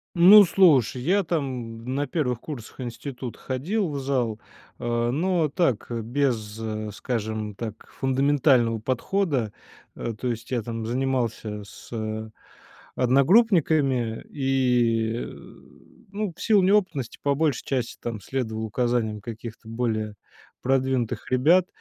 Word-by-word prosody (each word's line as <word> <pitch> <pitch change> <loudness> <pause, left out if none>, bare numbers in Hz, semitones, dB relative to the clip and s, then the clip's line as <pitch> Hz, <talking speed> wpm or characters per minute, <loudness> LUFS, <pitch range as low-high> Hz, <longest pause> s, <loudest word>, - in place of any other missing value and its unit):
Ну 190 +5 +9
слушай, 145 - +4
я 190 +9 +2
там 125 -9 -3
на 145 +2 -1
первых 130 -5 -1
курсах 135 -6 -9
института 120 0 -6
ходил 175 - -2
в 145 -2 -3
зал, 125 -5 -1 0.4
а, 120 0 0
но 170 +3 +1
так, 135 - 0
без, 115 -2 -1 0.4
скажем 110 -2 -3
так, 110 0 -7
фундаментального 130 -3 +3
подхода. 130 - -1 0.4
А, 115 - -4
то 110 +4 -5
есть 115 -1 -4
я 125 -2 0
там 115 0 -4
занимался 120 -4 -1
с 100 - -14 1.0
одногруппниками, 140 - +3
и, 125 -5 +1
э, - - -3 0.9
ну, 205 -2 -3
в - - -13
силу 210 -4 +4
неопытности 185 - +1
по 140 -1 +1
большей 150 -3 0
части 125 -4 -2
там 115 -2 -4
следовал 110 -1 -3
указаниям 110 -2 -1
каких-то 110 0 -8
более 110 -2 -2 0.5
продвинутых 130 -3 0
ребят, 165 +9 +4
125 Hz, 120 wpm, -25 LUFS, 115-145 Hz, 1.0 s, Ну